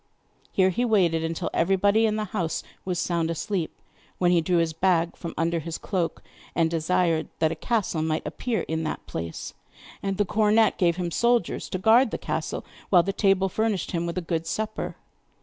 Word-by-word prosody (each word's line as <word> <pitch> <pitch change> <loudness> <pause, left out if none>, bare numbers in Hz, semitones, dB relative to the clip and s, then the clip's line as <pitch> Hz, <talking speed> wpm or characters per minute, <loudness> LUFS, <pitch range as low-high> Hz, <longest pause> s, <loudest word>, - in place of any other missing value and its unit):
Here 190 -1 +3
he 240 +7 0
waited 180 -8 +3
until 165 0 -2
everybody 200 +5 +3
in 215 - 0
the 215 0 -1
house 175 -6 -1 0.2
was 180 -2 -1
sound 170 -2 0
asleep, 170 +1 -2 0.5
when 175 -1 +3
he 175 -2 +4
drew 175 +2 +1
his 165 -1 +1
bag 170 0 +2
from 170 - -7
under 165 +1 +1
his 165 +1 -5
cloak, 180 -5 -2 0.3
and 165 -1 +2
desired 165 0 +1
that 160 -1 +2
a - - -2
castle 195 -2 -1
might 155 0 -1
appear 240 -3 -2
in 160 0 -2
that 155 - -4
place; 80 0 -5 0.5
and 195 -1 -2
the 205 - +2
cornet 215 +2 +3
gave 170 -2 +3
him 175 -1 -3
soldiers 235 -1 +1
to - - -2
guard 225 +6 +5
the - - -3
castle, - - -3 0.2
while 180 -3 +6
the 195 - -2
table 195 -1 +3
furnished 215 0 -1
him 170 -1 -1
with 170 - -4
a - - 0
good 165 -1 -2
supper. 215 +4 -3
180 Hz, 190 wpm, -26 LUFS, 165-205 Hz, 0.5 s, while